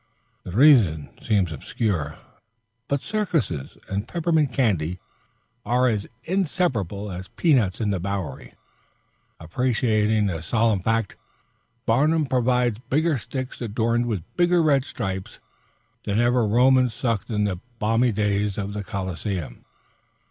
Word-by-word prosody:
The -, -, -10 dB
reason 105 Hz, -, +5 dB
seems 105 Hz, -, +1 dB
obscure, 80 Hz, -, -2 dB, 0.7 s
but 140 Hz, -1 st, -1 dB
circuses 165 Hz, -, -2 dB
and 100 Hz, +1 st, -3 dB
peppermint 160 Hz, -5 st, +1 dB
candy 95 Hz, -, 0 dB, 0.6 s
are 125 Hz, +3 st, +2 dB
as 105 Hz, -4 st, -1 dB, 0.2 s
inseparable 135 Hz, -, -1 dB
as 90 Hz, +1 st, -7 dB
peanuts 120 Hz, -, +2 dB
and 105 Hz, -3 st, 0 dB
the 95 Hz, -, -1 dB
Bowery. 95 Hz, -6 st, -5 dB, 0.8 s
Appreciating 110 Hz, +3 st, +1 dB
this 80 Hz, -4 st, -3 dB
solemn 110 Hz, -3 st, +2 dB
fact, 115 Hz, +2 st, -1 dB, 0.7 s
Barnum 150 Hz, +7 st, +3 dB
provides 125 Hz, -3 st, +1 dB
bigger 150 Hz, +3 st, 0 dB
sticks 130 Hz, +5 st, -6 dB
adorned 115 Hz, +1 st, 0 dB
with 105 Hz, -8 st, -2 dB
bigger 175 Hz, -1 st, +3 dB
red 140 Hz, -4 st, +3 dB
stripes 95 Hz, -4 st, -5 dB, 0.6 s
than 105 Hz, +1 st, 0 dB
ever 120 Hz, -1 st, +3 dB
Romans 125 Hz, +1 st, +4 dB
sucked 115 Hz, -5 st, -1 dB
in 105 Hz, -2 st, 0 dB
the 95 Hz, -4 st, -1 dB, 0.2 s
palmy 115 Hz, +3 st, +2 dB
days 105 Hz, -1 st, 0 dB
of 100 Hz, -1 st, -3 dB
the 105 Hz, 0 st, -4 dB
Coliseum. 95 Hz, -, -4 dB
110 Hz, 120 wpm, -24 LUFS, 100-130 Hz, 0.8 s, reason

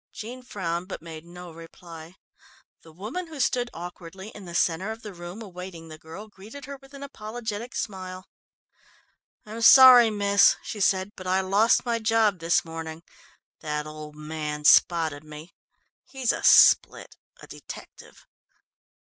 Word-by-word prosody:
Jean 240 Hz, +4 st, -8 dB
frowned 180 Hz, -7 st, -4 dB
but 190 Hz, -, -8 dB
made 160 Hz, -1 st, -10 dB
no 175 Hz, 0 st, -11 dB
reply. 165 Hz, +1 st, -13 dB, 0.7 s
The 160 Hz, -, -16 dB
woman 220 Hz, -, -6 dB
who 315 Hz, -3 st, -10 dB
stood 245 Hz, -2 st, 0 dB
awkwardly 180 Hz, +3 st, -9 dB
in 205 Hz, -3 st, -12 dB
the 170 Hz, -1 st, -9 dB
centre 180 Hz, +3 st, 0 dB
of 225 Hz, +1 st, -9 dB
the 210 Hz, -2 st, -8 dB
room 175 Hz, +5 st, -9 dB
awaiting 180 Hz, -4 st, -10 dB
the 155 Hz, 0 st, -11 dB
girl, 165 Hz, +8 st, -11 dB
greeted 215 Hz, +7 st, -12 dB
her 280 Hz, 0 st, -8 dB
with 270 Hz, +1 st, -17 dB
an 280 Hz, -, -9 dB
apologetic 225 Hz, -2 st, -7 dB
smile. 185 Hz, -2 st, -6 dB, 1.2 s
"I'm 220 Hz, +2 st, -8 dB
sorry, 250 Hz, -1 st, +9 dB
miss," 200 Hz, -1 st, +4 dB
she 215 Hz, -, -7 dB
said, 190 Hz, 0 st, +1 dB
"but 185 Hz, -, -9 dB
I 190 Hz, +1 st, +2 dB
lost 200 Hz, +7 st, +2 dB
my 235 Hz, -1 st, -1 dB
job 220 Hz, -3 st, +1 dB
this 165 Hz, +1 st, +1 dB
morning. 165 Hz, 0 st, -8 dB, 0.6 s
That 150 Hz, -1 st, -4 dB
old 155 Hz, 0 st, -10 dB
man 150 Hz, -1 st, -6 dB
spotted 160 Hz, -1 st, +4 dB
me. 155 Hz, +2 st, -12 dB, 0.5 s
He's 260 Hz, -3 st, -2 dB
a -, -, -5 dB
split -, -, +5 dB, 0.2 s
a -, -, -12 dB
detective." -, -, -13 dB
185 Hz, 150 wpm, -25 LUFS, 165-225 Hz, 1.2 s, sorry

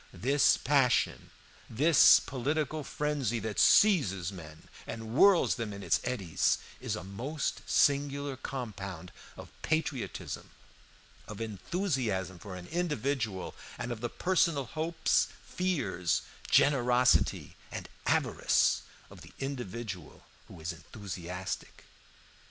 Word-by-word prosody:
This 140 Hz, +3 st, +3 dB
passion, 135 Hz, -3 st, +2 dB, 0.4 s
this 145 Hz, +6 st, +7 dB
political 150 Hz, +3 st, -2 dB
frenzy 145 Hz, -6 st, -1 dB
that 110 Hz, -2 st, -3 dB
seizes 100 Hz, -, +4 dB
men 80 Hz, -4 st, -11 dB, 0.2 s
and 110 Hz, 0 st, -6 dB
whirls 190 Hz, +3 st, +5 dB
them 110 Hz, -2 st, -3 dB
in 100 Hz, 0 st, -8 dB
its -, -, +2 dB
eddies, 100 Hz, -10 st, 0 dB, 0.2 s
is -, -, -3 dB
a 90 Hz, -, -6 dB
most 125 Hz, +11 st, -3 dB
singular 140 Hz, -1 st, +2 dB
compound 100 Hz, -10 st, -6 dB, 0.3 s
of -, -, -10 dB
patriotism, 155 Hz, -5 st, -3 dB, 0.8 s
of 105 Hz, -1 st, -8 dB
enthusiasm 110 Hz, -, -2 dB
for 100 Hz, -1 st, -8 dB
an 90 Hz, -1 st, -8 dB
individual, 140 Hz, -, -2 dB, 0.2 s
and 120 Hz, 0 st, -4 dB
of 115 Hz, -2 st, -5 dB
the 120 Hz, -, -2 dB
personal 170 Hz, -3 st, +1 dB
hopes, 160 Hz, +5 st, +1 dB, 0.2 s
fears, 130 Hz, -, -1 dB, 0.3 s
generosity, 125 Hz, -3 st, +3 dB, 0.2 s
and -, -, -6 dB, 0.2 s
avarice -, -, +2 dB, 0.3 s
of -, -, -13 dB
the -, -, -14 dB
individual 115 Hz, -, -6 dB, 0.2 s
who -, -, -12 dB
is 85 Hz, +3 st, -4 dB
enthusiastic. 90 Hz, -1 st, -7 dB
120 Hz, 110 wpm, -30 LUFS, 100-145 Hz, 0.8 s, this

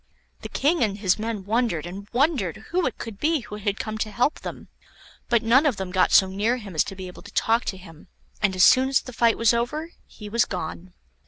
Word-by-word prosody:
The -, -, -7 dB
King 295 Hz, +1 st, +1 dB
and 200 Hz, -3 st, -1 dB
his 195 Hz, -1 st, +1 dB
men 215 Hz, -3 st, -4 dB
wondered 220 Hz, -7 st, 0 dB
and 195 Hz, +3 st, -8 dB
wondered 250 Hz, -, +1 dB
who 355 Hz, -2 st, +1 dB
it 255 Hz, -, -5 dB
could 215 Hz, -4 st, -8 dB
be 315 Hz, -1 st, +1 dB
who 210 Hz, -2 st, -8 dB
had 205 Hz, -1 st, -2 dB
come 215 Hz, 0 st, -4 dB
to 215 Hz, -, -1 dB
help 245 Hz, +7 st, 0 dB
them, -, -, -8 dB, 0.6 s
but 235 Hz, -1 st, +3 dB
none 240 Hz, +5 st, +5 dB
of 255 Hz, -8 st, 0 dB
them 190 Hz, -1 st, -5 dB
got 185 Hz, 0 st, +2 dB
so 190 Hz, -, +7 dB
near 205 Hz, +6 st, 0 dB
him 205 Hz, -6 st, -9 dB
as 155 Hz, -, +3 dB
to 195 Hz, -, -7 dB
be 190 Hz, -1 st, -7 dB
able 180 Hz, -, -10 dB
to 205 Hz, -, -12 dB
talk 230 Hz, +2 st, +2 dB
to 190 Hz, -, -3 dB
him, 165 Hz, -4 st, -14 dB, 0.3 s
and 195 Hz, -3 st, +2 dB
as 185 Hz, -, +4 dB
soon 260 Hz, +5 st, +6 dB
as 270 Hz, -, +3 dB
the 255 Hz, -, -10 dB
fight 230 Hz, 0 st, +3 dB
was 230 Hz, 0 st, +4 dB
over 300 Hz, +8 st, -2 dB, 0.2 s
he 210 Hz, -, -11 dB
was 235 Hz, +3 st, +2 dB
gone. 180 Hz, -1 st, -6 dB
215 Hz, 240 wpm, -24 LUFS, 190-245 Hz, 0.6 s, so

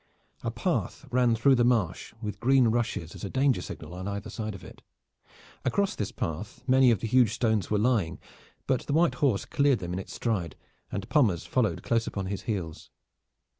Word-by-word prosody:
A -, -, -2 dB
path 140 Hz, +5 st, -2 dB
ran 125 Hz, -2 st, +3 dB
through 135 Hz, +5 st, +4 dB
the 120 Hz, -2 st, +4 dB
marsh 115 Hz, -8 st, +1 dB
with 105 Hz, -2 st, -4 dB
green 130 Hz, 0 st, +4 dB
rushes 110 Hz, -8 st, -1 dB
as -, -, -10 dB
a 100 Hz, -, -3 dB
danger 135 Hz, -5 st, +2 dB
signal 80 Hz, -1 st, -8 dB
on 95 Hz, +2 st, -6 dB
either 100 Hz, +1 st, -4 dB
side 110 Hz, -2 st, -4 dB
of 95 Hz, -, -11 dB
it. -, -, -13 dB, 0.8 s
Across 195 Hz, +10 st, +1 dB
this 105 Hz, -, -2 dB
path 85 Hz, +9 st, -5 dB
many 130 Hz, 0 st, +5 dB
of 110 Hz, -6 st, +2 dB
the -, -, -2 dB
huge 120 Hz, -2 st, +4 dB
stones 110 Hz, -6 st, +1 dB
were 105 Hz, -, +2 dB
lying, 105 Hz, -7 st, +1 dB, 0.5 s
but 130 Hz, -2 st, 0 dB
the 140 Hz, -, -1 dB
white 165 Hz, +2 st, +4 dB
horse 130 Hz, -9 st, +2 dB
cleared 140 Hz, -2 st, +2 dB
them 90 Hz, -3 st, -5 dB
in 90 Hz, -, -2 dB
its 95 Hz, -, -8 dB
stride 95 Hz, -, -2 dB, 0.4 s
and 95 Hz, 0 st, -4 dB
Pommers 110 Hz, -, +2 dB
followed 125 Hz, -5 st, 0 dB
close 115 Hz, -1 st, +1 dB
upon 100 Hz, -2 st, -3 dB
his 95 Hz, +1 st, -3 dB
heels. 85 Hz, -7 st, -4 dB
110 Hz, 195 wpm, -28 LUFS, 95-125 Hz, 0.8 s, many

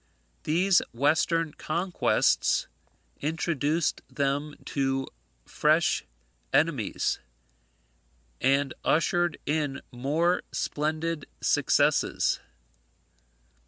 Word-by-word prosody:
These 180 Hz, +4 st, +4 dB
western 155 Hz, +4 st, +1 dB
conquests 175 Hz, +3 st, +1 dB, 0.5 s
introduced 160 Hz, 0 st, 0 dB
them 145 Hz, +1 st, -1 dB
to 135 Hz, -1 st, -1 dB, 0.4 s
fresh -, -, +2 dB, 0.5 s
enemies, 145 Hz, -10 st, +1 dB, 1.2 s
and 135 Hz, 0 st, +2 dB
ushered 175 Hz, 0 st, +2 dB
in 145 Hz, -2 st, -1 dB
more 155 Hz, +8 st, +1 dB
splendid 155 Hz, +1 st, -2 dB
successes. -, -, +2 dB
150 Hz, 60 wpm, -27 LUFS, 140-165 Hz, 1.2 s, These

